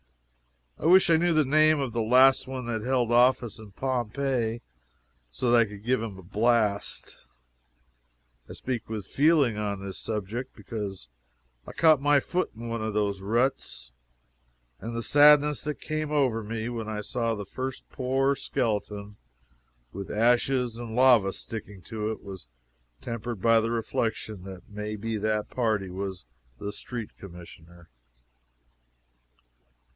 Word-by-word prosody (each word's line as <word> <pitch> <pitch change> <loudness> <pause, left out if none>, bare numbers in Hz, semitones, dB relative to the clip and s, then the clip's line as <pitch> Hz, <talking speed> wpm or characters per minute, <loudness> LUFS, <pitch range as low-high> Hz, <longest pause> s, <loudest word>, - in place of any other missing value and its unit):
I - - -6
wish 190 +1 +6
I 160 - +6
knew 175 +2 +2
the 155 -1 +4
name 155 +2 +4
of 130 -4 -2
the 115 - 0
last 130 +4 +5
one 130 -1 -5
that 115 -2 -2
held 125 -1 0
office 120 -2 +3
in 110 -2 -12
Pompeii 125 -1 -1 0.7
so 120 - -1
that 120 - +6
I 115 - +5
could 105 -1 -11
give 125 -1 +1
him 110 -4 -5
a 95 - -12
blast. 105 +1 0 1.3
I - - -7
speak 125 -4 -4
with 110 -3 -4
feeling 145 -6 +3
on 100 -2 -3
this 95 - -6
subject, 110 +4 -4
because 100 - -6 0.6
I - - -6
caught 155 -4 +5
my 145 0 +4
foot 180 +6 -1
in 115 +1 -7
one 115 -1 -3
of 110 -1 -3
those 100 -2 0
ruts, 100 - -1 0.9
and 115 +1 -6
the 115 - -2
sadness 150 +3 +5
that 150 -1 -3
came 155 -1 -3
over 130 -7 +1
me 110 +1 -4
when 115 -2 -4
I 105 -1 -3
saw 115 +1 -1
the 105 -1 -6
first 130 +6 -6
poor 135 +2 +1
skeleton, 105 -4 -3 0.8
with 100 +1 -6
ashes 120 +1 +1
and 115 -2 -6
lava 125 -6 +5
sticking 100 -3 -8
to 110 +4 -4
it, 110 - -7
was 95 -9 -9 0.6
tempered 115 -1 -4
by 115 +3 +5
the 115 - -1
reflection 110 -3 -2
that 95 -2 -10
may 105 0 -5
be 110 +1 -3
that 105 0 -1
party 110 -6 0
was 95 -4 -5 0.3
the 100 - -5
Street 115 +1 -7
Commissioner. 85 -2 -13
115 Hz, 150 wpm, -27 LUFS, 105-130 Hz, 1.3 s, wish